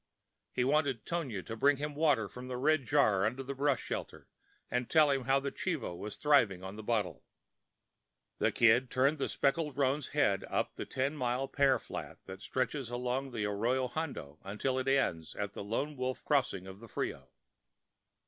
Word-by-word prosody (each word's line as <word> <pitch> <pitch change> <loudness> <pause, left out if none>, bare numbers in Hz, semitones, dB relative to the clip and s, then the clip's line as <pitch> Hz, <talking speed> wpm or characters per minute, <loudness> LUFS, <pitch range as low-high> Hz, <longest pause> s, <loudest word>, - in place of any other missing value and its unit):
He 125 - 0
wanted 135 -4 +1
Tonia 135 - -3
to 115 - -5
bring 140 +5 +4
him 150 +1 -3
water 145 -8 +2
from 125 +5 -9
the 125 -1 -4
red 145 0 +2
jar 110 -10 +4
under 125 +6 -1
the 135 +1 -4
brush 140 -1 +1
shelter, - - -5 0.4
and 125 -1 -1
tell 155 -3 +5
him 135 -2 0
how 135 +1 +4
the 140 0 -3
chivo 160 - -3
was 105 +4 -6
thriving 115 -11 +3
on 95 +1 -6
the 110 - -7
bottle. 110 -3 -1 1.2
The - - +3
Kid 120 +2 +4
turned 135 +4 +2
the - - -1
speckled 145 0 0
roan's 140 0 +1
head 100 -10 +2
up - - -1
the - - -6
ten 135 +3 -1
mile 130 -1 -1
pear 135 -2 +3
flat - - -7
that 95 +1 -9
stretches 130 +1 -2
along 125 +2 -2
the 115 -5 -2
Arroyo 120 +6 +1
Hondo 120 - -5
until 120 +7 -1
it 130 - -3
ends 90 - +1
at 100 -1 -3
the - - -6
Lone 135 +9 -2
Wolf 130 0 -3
Crossing 130 -10 +1
of 95 +1 -10
the 115 - -11
Frio. - - -4
130 Hz, 185 wpm, -32 LUFS, 110-140 Hz, 1.2 s, tell